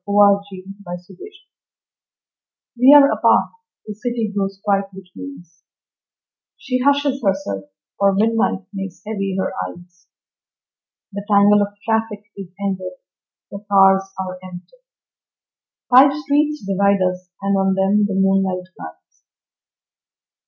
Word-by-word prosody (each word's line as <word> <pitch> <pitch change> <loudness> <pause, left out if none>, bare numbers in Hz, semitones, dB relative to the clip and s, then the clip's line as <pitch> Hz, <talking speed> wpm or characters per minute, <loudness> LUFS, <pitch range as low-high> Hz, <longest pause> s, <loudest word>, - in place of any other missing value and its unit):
Sara 200 0 +4
Teasdale 190 0 -10
At 175 0 -5 0.2
Night 180 - -19 1.6
WE 250 +3 +6
are 280 -1 +7
apart; - - +2 0.3
the 210 - -6
city 225 -1 -4
grows 195 -1 -3
quiet 200 -1 +1
between 195 +10 -10
us, 170 -1 -27 1.0
She 255 -1 -3
hushes 280 -1 +1
herself, 190 - -2 0.3
for 200 0 +4
midnight 220 -2 0
makes 195 -2 -7
heavy 195 -3 -3
her - - -2 0.2
eyes, 175 - -16 1.0
The 200 0 -6
tangle 205 0 +5
of 205 0 -3
traffic 220 -2 -1
is 195 -2 -8 0.2
ended, 185 -2 -4 0.6
the 200 +1 -9
cars 195 -1 +4
are 185 -1 -5
empty, 185 - -12 1.2
Five 275 +2 +8
streets 300 -3 -1
divide 200 0 +1
us, 180 0 -6
and 200 0 +1
on 195 0 +1
them 200 +2 +2
the 200 - -4
moonlight 190 -1 0
lies. 80 0 -13
200 Hz, 125 wpm, -19 LUFS, 190-215 Hz, 1.6 s, Five